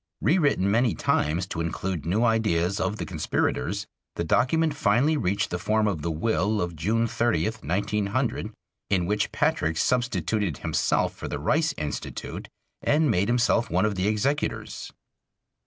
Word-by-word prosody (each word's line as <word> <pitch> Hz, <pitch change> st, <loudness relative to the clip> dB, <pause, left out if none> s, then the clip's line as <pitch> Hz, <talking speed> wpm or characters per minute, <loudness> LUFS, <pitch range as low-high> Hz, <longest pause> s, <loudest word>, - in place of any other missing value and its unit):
Rewritten 145 Hz, -, +2 dB
many 115 Hz, +1 st, +2 dB
times 80 Hz, +4 st, +1 dB
to 80 Hz, -, -3 dB
include 85 Hz, -1 st, -3 dB
new 105 Hz, +7 st, +2 dB
ideas 105 Hz, -5 st, +1 dB
of 105 Hz, -, 0 dB
the -, -, -4 dB
conspirators, 80 Hz, -4 st, -1 dB, 0.3 s
the -, -, -1 dB
document 145 Hz, -, +2 dB
finally 135 Hz, +4 st, +2 dB
reached 100 Hz, -7 st, 0 dB
the 90 Hz, -, -2 dB
form 110 Hz, +3 st, +1 dB
of 90 Hz, -7 st, -1 dB
the 85 Hz, -, -2 dB
will 105 Hz, +5 st, 0 dB
of 85 Hz, -2 st, -2 dB
June 110 Hz, +9 st, +1 dB
30, 115 Hz, -7 st, +1 dB
1900, 105 Hz, +3 st, -1 dB, 0.4 s
in 90 Hz, -3 st, +2 dB
which 105 Hz, +3 st, 0 dB
Patrick 80 Hz, 0 st, 0 dB
substituted 105 Hz, -, 0 dB
himself -, -, 0 dB
for -, -, -7 dB
the -, -, -3 dB
Rice 155 Hz, -, +1 dB
Institute 75 Hz, -1 st, -5 dB, 0.3 s
and 150 Hz, -2 st, +3 dB
made 100 Hz, 0 st, +1 dB
himself 120 Hz, -2 st, +2 dB
one 90 Hz, +4 st, +2 dB
of 105 Hz, -, +1 dB
the 95 Hz, 0 st, -1 dB
executors. 110 Hz, +8 st, -1 dB
105 Hz, 150 wpm, -26 LUFS, 90-120 Hz, 0.4 s, and